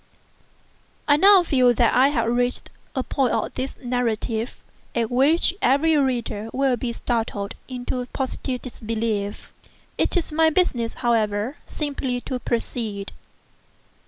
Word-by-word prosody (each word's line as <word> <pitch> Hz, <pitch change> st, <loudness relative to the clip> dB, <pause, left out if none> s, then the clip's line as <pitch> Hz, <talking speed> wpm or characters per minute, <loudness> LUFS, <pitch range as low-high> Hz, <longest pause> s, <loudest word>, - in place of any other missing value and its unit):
I 290 Hz, -, +6 dB
now 385 Hz, +3 st, +7 dB
feel 255 Hz, -6 st, +3 dB
that 235 Hz, 0 st, +3 dB
I 260 Hz, +2 st, +5 dB
have 250 Hz, -6 st, 0 dB
reached 245 Hz, +1 st, 0 dB, 0.2 s
a 260 Hz, -, 0 dB
point 260 Hz, -2 st, 0 dB
of -, -, -1 dB
this 265 Hz, +1 st, -4 dB
narrative 240 Hz, -1 st, -1 dB, 0.4 s
at 230 Hz, -1 st, 0 dB
which 290 Hz, +8 st, +3 dB
every 310 Hz, +5 st, +3 dB
reader 240 Hz, -6 st, -1 dB
will 270 Hz, -1 st, +2 dB
be 240 Hz, 0 st, -3 dB
startled 225 Hz, -4 st, -2 dB
into 250 Hz, 0 st, -3 dB
positive 260 Hz, -1 st, -3 dB
disbelief. 220 Hz, -4 st, -3 dB, 0.5 s
It -, -, +2 dB
is 340 Hz, -, -1 dB
my 320 Hz, +1 st, +4 dB
business, 270 Hz, -9 st, +1 dB
however, 220 Hz, +2 st, +1 dB
simply 275 Hz, -4 st, -3 dB
to 255 Hz, 0 st, -4 dB
proceed. 225 Hz, -4 st, -3 dB
245 Hz, 130 wpm, -23 LUFS, 230-275 Hz, 0.5 s, now